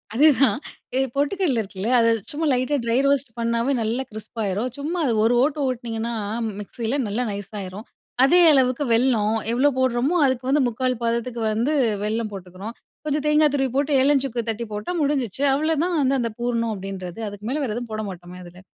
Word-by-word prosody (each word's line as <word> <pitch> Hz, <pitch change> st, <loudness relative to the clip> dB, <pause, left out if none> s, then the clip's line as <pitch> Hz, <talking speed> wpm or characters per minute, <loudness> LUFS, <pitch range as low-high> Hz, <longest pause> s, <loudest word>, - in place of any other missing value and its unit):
அதேதான். 280 Hz, -1 st, +5 dB, 0.4 s
எ -, -, +3 dB, 0.2 s
பொட்டுக்கல்ல 290 Hz, -, +1 dB
இருக்குல்ல, 200 Hz, +2 st, -5 dB
அத 230 Hz, -, +4 dB, 0.2 s
சும்மா 315 Hz, +2 st, -2 dB
லைட்டா 255 Hz, +3 st, +1 dB
ட்ரை 230 Hz, +1 st, +1 dB
ரோஸ்ட் 280 Hz, -2 st, +1 dB
பண்ணாவே 235 Hz, +3 st, 0 dB
நல்லா 230 Hz, +4 st, -1 dB
கிரிஸ்ப் 220 Hz, +2 st, -9 dB
ஆயிரும். 205 Hz, +5 st, -1 dB
சும்மா 310 Hz, +5 st, -3 dB
அத 235 Hz, -, +1 dB
ஒரு 230 Hz, -, +3 dB
ஓட்டு, 295 Hz, +1 st, 0 dB
ஓட்டுனீங்கன்னா 235 Hz, -2 st, -3 dB, 0.5 s
மிக்ஸில, 230 Hz, +5 st, -3 dB
நல்லா 220 Hz, +5 st, -1 dB
நைஸ் 200 Hz, +1 st, -6 dB
ஆயிரும். 195 Hz, +3 st, -7 dB, 0.4 s
அதே 350 Hz, +6 st, +5 dB
அளவுக்கு 255 Hz, 0 st, +2 dB
வெல்லம் 225 Hz, -3 st, +2 dB, 0.2 s
எவ்ளோ 275 Hz, +4 st, +4 dB
போடறம்மோ! 260 Hz, +5 st, +1 dB
அதுக்கு 260 Hz, -1 st, 0 dB
வந்து 290 Hz, +1 st, +3 dB
3/4 250 Hz, +1 st, -1 dB
பதத்துக்கு 235 Hz, 0 st, -1 dB
வந்து 230 Hz, +7 st, 0 dB, 0.3 s
வெல்லம் 215 Hz, 0 st, -2 dB
போட்டுக்கிறோம். 190 Hz, +3 st, -8 dB, 0.3 s
கொஞ்சம் 300 Hz, 0 st, -1 dB
தேங்கா 300 Hz, 0 st, +5 dB
துருவி 270 Hz, -2 st, +1 dB
போட்டு, 285 Hz, +2 st, +1 dB
ஏலம், 280 Hz, 0 st, +4 dB
சுக்கு 235 Hz, -3 st, -3 dB
தட்டி 225 Hz, +1 st, -3 dB
போட்டா 210 Hz, +10 st, -4 dB
முடிஞ்சுச்சி. 275 Hz, -5 st, -1 dB
அவ்ளோதான் 320 Hz, +4 st, +1 dB
அந்த, 265 Hz, +1 st, +2 dB
அந்த 230 Hz, -, -1 dB
பூரணம் 235 Hz, -1 st, -1 dB
அப்பிடின்றது. 190 Hz, -1 st, -7 dB
அதுக்கு 205 Hz, +1 st, -9 dB
மேல 295 Hz, +4 st, -1 dB
வேற 220 Hz, -5 st, -2 dB
எதுவும் 240 Hz, -2 st, -5 dB
போட 215 Hz, -, -2 dB
மாட்டோமே! 180 Hz, 0 st, -10 dB
அதுல. 175 Hz, +1 st, -13 dB
240 Hz, 175 wpm, -23 LUFS, 220-275 Hz, 0.5 s, அதேதான்